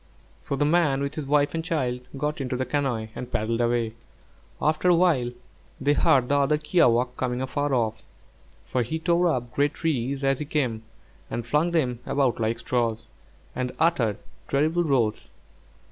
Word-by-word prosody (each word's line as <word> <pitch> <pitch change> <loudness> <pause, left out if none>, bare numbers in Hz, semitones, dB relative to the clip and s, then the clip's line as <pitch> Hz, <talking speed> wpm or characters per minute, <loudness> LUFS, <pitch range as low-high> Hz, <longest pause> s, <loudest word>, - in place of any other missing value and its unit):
So - - -3
the 145 - +1
man 150 -4 +2
with 140 - -3
his 150 -3 -5
wife 145 0 +2
and 165 0 -2
child 135 -8 -1 0.2
got 150 +1 -2
into 125 -1 -2
the 130 - -1
canoe 130 -7 -1
and 125 0 -7
paddled 115 0 0
away. 120 -2 +1 0.7
After 155 +4 +2
a 175 - +6
while 160 -9 +2 0.5
they 145 +2 +2
heard 130 -3 +3
the 145 +1 +2
other 140 +2 +3
kiawākq' 125 -6 +2
coming 125 -1 -1
afar 145 +3 -1
off, 110 -4 0 0.6
for 125 - -1
he 140 +8 -2
tore 170 +2 +2
up 125 -6 -1
great 145 +1 +1
trees 140 -3 -1
as 135 -1 +2
he 150 - -3
came 130 -7 -1 0.5
and 120 0 -4
flung 150 +7 +2
them 130 -8 0
about 135 -5 +1
like 115 +1 0
straws, 115 -1 -1 0.5
and 125 0 -2
uttered 125 -11 +2 0.3
terrible 155 +5 +2
roars. 120 -8 0
135 Hz, 170 wpm, -25 LUFS, 120-150 Hz, 0.7 s, a